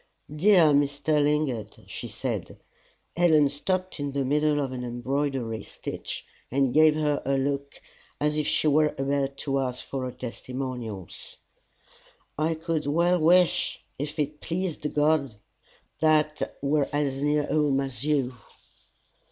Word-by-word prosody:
"Dear 170 -2 +6
Mr. 145 +1 +2
Lingard," 145 -6 -1
she - - -7
said, - - -4 0.6
Helen 160 -4 +5
stopped 185 +5 -2
in 145 -1 -3
the 140 -1 0
middle 150 +2 +2
of 135 -2 -1
an 125 -1 -5
embroidery 125 -1 -2
stitch, - - -6 0.3
and 135 -1 +2
gave 155 +1 +6
her 150 -2 0
a 135 +1 +1
look 140 +1 -2 0.4
as 150 +1 +1
if 150 -1 0
she - - +1
were 150 +1 +3
about 140 0 -1
to 135 -1 -1
ask 125 -1 -3
for 135 -2 -4
her 125 - -4
testimonials 125 -5 -6 1.0
"I 160 +2 0
could 160 -2 -2
well 170 +4 +3
wish, 175 +2 +3 0.2
if 150 +2 -4
it 150 0 -2
pleased 170 -3 -3
God, 150 -5 +2 0.6
that 155 -1 +3
I - - -5
were 145 0 +2
as 140 -2 -1
near 145 0 +2
home 145 -3 +2
as 135 -2 -3
you." 140 -4 +1
145 Hz, 140 wpm, -26 LUFS, 135-155 Hz, 1.0 s, Dear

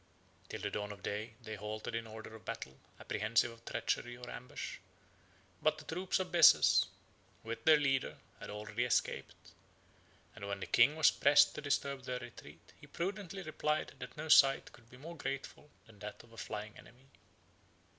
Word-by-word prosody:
Till - - -6
the - - -2
dawn 105 0 -3
of 100 -1 -11
day, 110 +2 -4
they 110 - -6
halted 105 +2 -5
in 115 0 -3
order 110 0 -9
of 110 - -13
battle, 65 - -6 0.2
apprehensive 115 +3 +1
of 115 0 -16
treachery 120 0 -2
or 125 0 -8
ambush; 125 - -6 0.8
but - - +2
the - - -11
troops 180 +3 -1
of 185 -1 -3
Bessas, 170 -2 +7 0.6
with 115 0 -5
their 155 -1 +8
leader, 135 -3 0 0.2
had - - -8
already 105 +2 -3
escaped; 120 - -1 0.8
and 100 -2 -7
when 100 -1 -3
the 95 - -4
king 125 +6 +5
was 155 - +6
pressed 145 +1 +5
to - - -6
disturb 140 -2 -1
their 125 0 -2
retreat, 120 -1 -12
he - - -13
prudently 195 +1 -4
replied, 155 -1 -1
that - - -8
no 155 +1 -5
sight 135 -3 +6
could 115 -1 -19
be 125 - -14
more 165 +6 -9
grateful 140 +1 -5 0.2
than 115 -3 -18
that 105 0 -8
of 115 -1 -19
a - - -15
flying 105 -1 -6
enemy. 125 +3 -17
120 Hz, 175 wpm, -34 LUFS, 110-150 Hz, 0.8 s, their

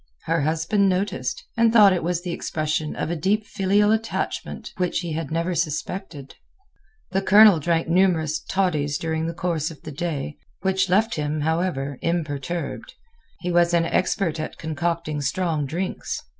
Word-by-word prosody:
Her 165 -1 0
husband 165 +7 +2
noticed, 200 - -2
and 230 -1 +4
thought 210 -4 +7
it 180 - -1
was 175 +1 -1
the 180 - -3
expression 155 -2 -2
of 160 - -2
a - - -1
deep 200 +7 +1
filial 205 +1 +2
attachment 220 0 -3
which 180 -2 0
he 170 -3 -4
had 155 -2 -3
never 170 +3 -1
suspected. 165 -2 -3 0.8
The 190 +1 +1
Colonel 205 -2 +7
drank 165 +2 0
numerous 165 -3 +2
"toddies" 155 -7 0
during 160 0 -2
the 165 - -4
course 165 -3 -1
of 165 - -13
the 155 - -7
day, 150 -2 -4 0.2
which 190 0 +1
left 215 +5 +3
him, 150 0 -2
however, 150 -4 -1
imperturbed. 170 - -3 0.5
He 180 - -2
was 175 0 +3
an 165 -1 +3
expert 170 -2 0
at 155 - -5
concocting 160 -1 -2
strong 155 0 -1
drinks. 180 +6 -3
170 Hz, 155 wpm, -23 LUFS, 155-190 Hz, 0.8 s, thought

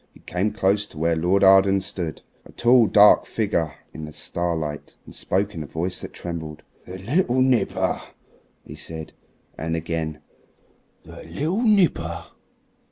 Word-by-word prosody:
He - - -16
came 95 +4 -1
close 105 -1 +1
to 80 - -15
where 85 +1 +1
Lord 90 +5 +2
Arden 95 0 +6
stood 90 -4 -4 0.2
a - - -15
tall, 120 -1 +4
dark 105 0 +6
figure 90 -9 -1 0.2
in 80 - -7
the 75 - -9
starlight 80 -2 -3
and - - -13
spoke 100 +2 -1
in 80 - -6
a 75 - -6
voice 90 +5 -3
that - - -7
trembled. 80 -3 -7 0.2
"The 90 +1 -7
little 125 - 0
nipper," 130 -5 +1 0.6
he - - -10
said; 80 -1 -8 0.5
and 80 +1 -2
again, 80 -1 -3 0.8
"the - - -12
little 155 - -2
nipper. 170 - +2
90 Hz, 150 wpm, -23 LUFS, 80-105 Hz, 0.8 s, Arden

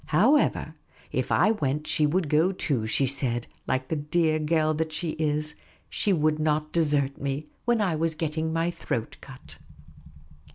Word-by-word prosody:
However, 240 - +3 0.4
if - - -2
I 215 - +4
went, 150 -7 -1
she 150 - +2
would 170 +2 0
go 155 +5 +3
too, 135 - -1
she 135 +5 +2
said, 125 -3 0 0.2
like 130 +2 -1
a - - +2
dear 155 +1 +1
girl 155 0 +1
that 160 +1 -2
she 165 +1 -2
is; 155 -1 -2 0.4
she 205 - 0
would 155 -3 +2
not 155 0 0
desert 145 -4 +1
me 140 +2 -3 0.2
when 240 -2 +2
I 185 -6 +1
was 160 0 0
getting 160 0 -2
my 165 +1 0
throat 115 -8 -4
cut. 135 -1 -13
155 Hz, 165 wpm, -26 LUFS, 145-165 Hz, 0.4 s, I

